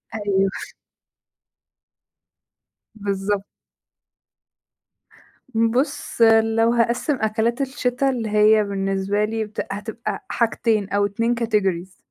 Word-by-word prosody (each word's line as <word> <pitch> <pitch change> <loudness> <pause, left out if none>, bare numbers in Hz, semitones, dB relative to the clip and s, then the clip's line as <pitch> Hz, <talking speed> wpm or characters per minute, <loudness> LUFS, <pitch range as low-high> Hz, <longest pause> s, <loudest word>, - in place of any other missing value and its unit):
أيوه. 195 -2 +1 2.5
بالضب 200 -1 -2 2.1
بُص، 240 +4 0 0.2
لو 225 +1 +2
هاقسّم 235 +5 +1
أكلات 225 +4 0
الشِتا 265 0 0
اللي 235 -4 -2
هي 215 +1 +5
بالنسبة 195 0 -1
لي 220 0 -2
بت 210 0 -5
هتبقى 220 +3 -5
حاجتين 225 -3 0
أو 200 0 +1
2 230 +4 0
categories. 195 -5 -1
220 Hz, 85 wpm, -22 LUFS, 200-230 Hz, 2.5 s, هي